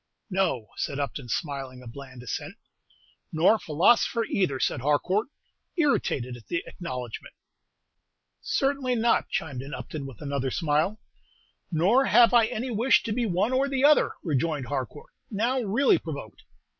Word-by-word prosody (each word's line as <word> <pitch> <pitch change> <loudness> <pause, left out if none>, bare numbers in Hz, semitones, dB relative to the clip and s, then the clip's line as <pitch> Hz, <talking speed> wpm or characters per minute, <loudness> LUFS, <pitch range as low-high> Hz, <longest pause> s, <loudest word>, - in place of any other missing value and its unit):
"No," 180 - 0
said 140 - -2
Upton, 140 -3 -4
smiling 135 -1 -4
a - - -11
bland 130 0 -10
assent. 125 - -5 0.8
"Nor 165 +6 +4
a 225 - 0
philosopher 205 +9 +3
either," 175 -12 0
said - - 0
Harcourt, 175 - +1 0.5
irritated 135 - +1
at 120 - -14
the 170 - -2
acknowledgment. 125 -9 -7 1.1
"Certainly 270 -2 0
not," 230 0 +2
chimed 140 -6 -3
in 140 +4 -6
Upton, 145 -3 -6
with 130 -6 -11
another 140 -2 -2
smile. 160 - 0 0.7
"Nor 195 +12 +3
have 240 +1 +6
I 235 -2 +6
any 245 +4 -3
wish 235 +4 +3
to 225 - -3
be 240 0 0
one 200 +6 +1
or 265 +2 +2
the 270 -1 0
other," 300 0 +5
rejoined 150 -3 -1
Harcourt, 140 +1 -5 0.2
now 235 +5 0
really 230 +6 +3
provoked. 140 -9 -8
165 Hz, 145 wpm, -26 LUFS, 135-230 Hz, 1.1 s, have